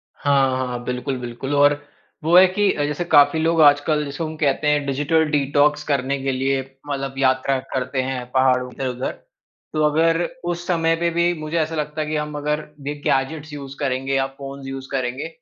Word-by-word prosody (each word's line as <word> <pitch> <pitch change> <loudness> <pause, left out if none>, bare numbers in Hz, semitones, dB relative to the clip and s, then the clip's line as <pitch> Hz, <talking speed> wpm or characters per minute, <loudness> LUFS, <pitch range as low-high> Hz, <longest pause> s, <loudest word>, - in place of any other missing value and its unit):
हाँ, 135 -2 +2
हाँ, 120 0 -5
बिल्कुल, 125 +2 -3
बिल्कुल 125 +4 -4
और 145 0 +4 0.4
वो 165 +2 +3
है 185 - +9
कि 200 +2 +1
जैसे 145 +3 -1
काफ़ी 145 -1 +5
लोग 165 0 +2
आजकल 150 +1 +4
जैसे 145 +4 -5
हम 160 0 -4
कहते 150 0 +1
हैं 145 -1 +2
डिजिटल 145 +4 +1
डिटॉक्स 145 +1 +2
करने 140 -1 0
के 135 - 0
लिए 135 +1 0 0.3
मतलब 135 -1 -3
यात्रा 130 0 +2 0.2
करते 130 0 -1
हैं 130 -1 -3
पहाड़ो 130 -1 +2
के 130 +1 -4
उधर। 125 +1 -3 0.6
तो 155 - +1
अगर 165 +2 +2 0.3
उस 175 0 -5
समय 165 -2 +2
पे 170 +1 0
भी 170 +1 +1
मुझे 155 +2 -3
ऐसा 160 +1 -1
लगता 150 0 -3
है 150 - -3
कि 155 - -2
हम 150 0 -3
अगर 150 +1 -2 0.2
ये 145 - -1
गैजेट्स 150 +3 -1
यूज़ 140 -2 -8
करेंगे 135 -1 -1
या 135 - +2
फ़ोन्स 135 -1 -8
यूज़ 135 0 -6
करेंगे 130 +2 -2
145 Hz, 190 wpm, -21 LUFS, 135-155 Hz, 0.6 s, है